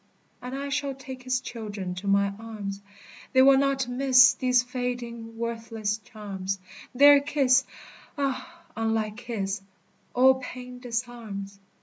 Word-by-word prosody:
And 250 +2 -6
I 280 0 -4
shall 280 -1 -2
take 260 -1 -9
his 255 0 0
children 210 -7 -6
to 180 +3 -7
my 200 0 +3
arms; 205 -3 -6 0.5
They 260 0 +7
will 270 0 +7
not 275 -2 +1
miss 255 0 +6
these 250 -1 +2
fading, 245 -2 -5
worthless 225 -2 -3
charms; 200 -4 -5 0.4
Their 285 +2 +8
kiss 275 -2 +3 0.5
ah! 285 +5 -3
unlike 220 -1 -1
his 210 -5 -3 0.5
all 260 +1 +6
pain 250 0 -8
disarms. 230 -5 -5
245 Hz, 125 wpm, -27 LUFS, 215-260 Hz, 0.5 s, Their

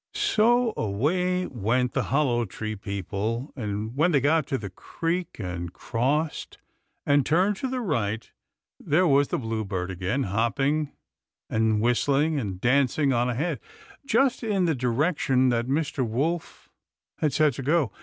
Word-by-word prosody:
So 235 +2 +3
away 180 - 0
went 125 +2 0
the - - 0
Hollow 130 -4 +1
Tree 110 +2 -5
people, 105 - -4
and 110 -1 -4
when 160 +5 +3
they 145 - +4
got 150 +2 +2
to 135 - -1
the 100 -5 -7
creek, 170 - -3
and 90 -4 -5
crossed, 145 - -2 0.5
and 145 -1 +4
turned 185 +9 +2
to 265 - -2
the 255 0 -2
right, 110 - -1 0.5
there 175 +6 +2
was 140 -3 +4
the - - -1
bluebird 105 -6 -3
again, 95 +9 -1
hopping 135 +9 0 0.6
and 110 -1 +2
whistling 140 +6 +2
and 95 -7 -4
dancing 135 +3 +2
on 120 +1 +1
ahead, 140 +3 -1 0.4
just 275 -2 +2
in 205 -5 +1
the 165 - +2
direction 130 0 +1
that 120 0 0
Mr. 140 -1 0
Wolf 145 +9 -3 0.5
had 150 - +1
said 150 +1 +3
to 130 - -6
go. 145 -3 +1
135 Hz, 145 wpm, -26 LUFS, 110-160 Hz, 0.6 s, they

